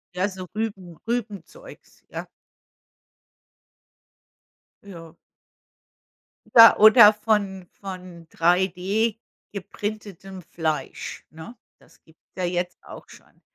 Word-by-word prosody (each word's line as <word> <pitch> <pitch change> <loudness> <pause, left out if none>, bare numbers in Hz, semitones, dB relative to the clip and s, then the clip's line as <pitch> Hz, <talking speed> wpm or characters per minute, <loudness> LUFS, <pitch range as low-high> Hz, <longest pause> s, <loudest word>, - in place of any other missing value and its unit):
Ja, 190 +3 0
so 185 -1 -9
Rüben, 195 -6 -5
Rübenzeugs, 230 - -7
ja. - - -7 2.6
Ja. 170 -4 -13 1.4
Ja. 230 -1 +9
Oder 215 0 +8
von 200 -4 -2
von 185 -3 -10
3D 190 +6 0 0.3
geprintetem 200 -1 -7
Fleisch, 160 -2 -5
ne? 160 +10 -12 0.2
Das - - -25
gibt's 160 - -26 0.2
ja 185 - -2
jetzt 180 0 -3
auch - - -13
schon. - - -19
190 Hz, 90 wpm, -23 LUFS, 175-210 Hz, 2.6 s, Ja